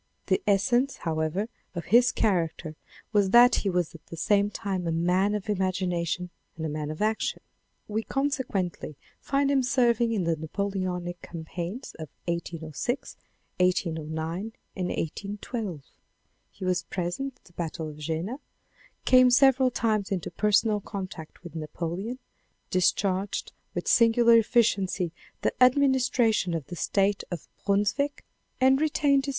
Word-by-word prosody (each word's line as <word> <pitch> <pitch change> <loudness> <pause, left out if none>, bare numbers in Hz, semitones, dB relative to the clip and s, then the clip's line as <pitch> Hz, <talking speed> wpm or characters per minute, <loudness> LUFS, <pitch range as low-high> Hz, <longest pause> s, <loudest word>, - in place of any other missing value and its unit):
The - - +1
essence^ 240 +7 +2
however, 160 +5 -1 0.3
of 170 - -4
his 245 +1 +7
character 170 -5 0 0.4
was 205 -2 +3
that 240 +4 +7
he 200 - 0
was 180 -2 0
at 165 - -13
the 165 - -8
same 205 +4 +2
time 190 -4 -3
a - - +1
man 180 +5 +2
of 210 -1 -4
imagination 180 -3 -1 0.3
and 160 - -3
a - - -2
man 150 0 -3
of 155 +6 -3
action. 215 0 -1 0.4
We 215 +1 -1
consequently 235 - -2 0.2
find 275 0 +1
him 275 -1 +3
serving 240 -2 +2
in 210 -5 0
the 165 -1 +1
Napoleonic 180 +1 -3
cam 165 -2 -8
paigns 180 +10 -5
of 155 -3 -6 0.2
1806, 170 - -3 0.4
1809 165 +2 -1 0.2
and 185 -2 -2
1 - - -3
81 200 +6 -4
2. 205 - -4 0.7
He 190 - -8
was 185 -1 +1
present 190 +10 -4
at - - -33
the 175 - -20
Battle 165 -1 -4
of 150 -1 -9
Jena, 165 - -3 0.7
came 255 -1 +7
several 265 0 +5
times 215 -4 0
into 185 -3 -2
personal 210 +1 +2
contact 185 -5 -7
with 175 -3 -9
Napoleon, 170 +8 -4 0.5
discharged 190 +1 +1 0.2
with - - -3
singular 230 0 +5
efficiency 200 -6 +2 0.3
the - - +1
administration 250 -7 +3
of 160 -4 -4
the 175 - -7
State 195 +3 +1
of 175 - -6 0.2
Brunswick, 210 +9 +1 0.3
and 265 +2 +4
retained 285 -3 +2
viii. - - -3
195 Hz, 145 wpm, -27 LUFS, 170-235 Hz, 0.7 s, his